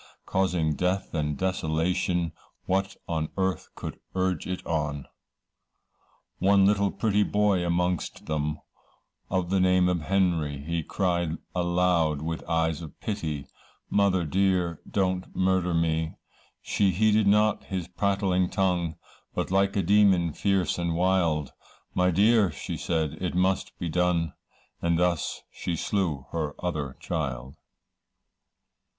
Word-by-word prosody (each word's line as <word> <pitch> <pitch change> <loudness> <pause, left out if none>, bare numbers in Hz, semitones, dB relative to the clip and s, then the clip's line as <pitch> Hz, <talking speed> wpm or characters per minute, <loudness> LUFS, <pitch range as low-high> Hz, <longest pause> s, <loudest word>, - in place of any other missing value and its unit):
Causing 90 -5 +1
death 90 +5 -1
and 75 -3 -1
desolation, 85 0 0 0.3
What 95 +1 0
on 80 -2 -1
earth 95 -1 -1
could - - -7 0.2
urge 95 -3 0
it 90 0 -4
on? 75 -3 -2 1.3
One 100 +1 +5
little 100 0 +3
pretty 105 0 +1
boy 105 -3 +2
amongst 90 0 -1
them, 75 0 -1 0.7
Of 90 -1 -1
the 95 - +3
name 90 0 +4
of 90 -2 0
Henry, 85 -5 +1
He 85 +4 -2
cried 85 -1 -1 0.2
aloud 85 -4 +1
with 80 0 -3
eyes 80 -1 +1
of 80 - -10
pity, 80 -10 -3 0.5
'Mother, 95 -4 +3
dear, 90 -1 +1
don't 95 -2 -1
murder 95 -1 +2
me,' 80 -1 0 0.5
She 100 - +2
heeded 105 +3 +3
not 105 +1 +3
his 95 -3 -4
prattling 95 -1 +1
tongue, 90 -4 0 0.4
But - - -2
like 100 +1 +2
a 100 - +2
demon 95 -4 +4
fierce 95 -1 +1
and 85 -1 -1
wild, 85 -5 +1 0.4
'My 90 0 +3
dear,' 100 +1 +4
said 80 +1 -2
she, - - -7
'it 90 - -1
must 95 +1 0
be 85 - -3
done,' 85 -1 +1 0.5
And 85 -1 +2
thus 90 -2 0
she 85 - -3
slew 80 -7 -1
her 75 -3 -2
other 75 -7 -3
child. 65 -5 -3
90 Hz, 130 wpm, -27 LUFS, 80-95 Hz, 1.3 s, One